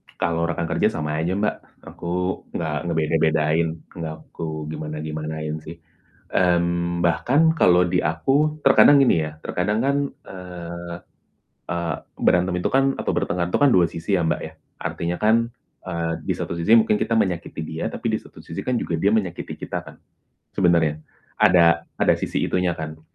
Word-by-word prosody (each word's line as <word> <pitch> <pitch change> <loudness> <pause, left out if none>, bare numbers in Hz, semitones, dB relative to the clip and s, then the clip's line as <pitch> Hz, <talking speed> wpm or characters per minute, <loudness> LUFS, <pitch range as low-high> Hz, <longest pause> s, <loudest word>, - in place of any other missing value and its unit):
Kalau 85 0 0
rekan 85 0 -2
kerja - - +2
sama 75 0 -2
aja 85 +4 0
Mbak, 105 +1 -3
aku 90 +2 -4
nggak 80 -3 -2
ngebeda-bedain, 80 0 +2 0.2
nggak 80 -2 -5 0.2
aku 80 -1 -5
gimana-gimanain 75 0 -4
sih. 80 +2 -9 0.6
Mmm, 85 -1 +1
bahkan 140 - +3
kalau 90 - +4
di 90 0 +1
aku 140 - +1
terkadang 140 +1 +7
gini 80 -10 +3
ya, 75 - -10
terkadang 105 +4 -1
kan, 140 +1 +2 0.3
eee 85 -2 -8 0.7
eee, 85 -2 -2 0.3
berantem 90 +1 +3
itu - - 0
kan 135 0 +3
atau - - -4
bertengkar 85 0 0
itu - - +1
kan 145 - +6
dua 90 -2 +5
sisi 85 +6 -4
ya 95 - +3
Mbak 80 -2 0
ya, 80 - -9 0.2
artinya 85 +1 -3
kan, 110 +1 +4 0.5
eee 85 -2 -2
di - - +2
satu - - -4
sisi 85 +5 -1
mungkin 110 -1 +3
kita 115 - +1
menyakiti 90 -6 -1
dia, 80 +1 -4
tapi - - -3
di - - +2
satu - - -18
sisi - - -6
kan 125 -1 -1
juga 85 - -2
dia 100 - +4
menyakiti 95 -6 -2
kita - - -4
kan - - -13 0.6
sebenarnya, 85 -5 +2 0.4
ada 85 -5 +5
ada - - +3
sisi - - -3
itunya 90 -2 0
kan. 80 0 -6
85 Hz, 165 wpm, -23 LUFS, 80-95 Hz, 0.7 s, terkadang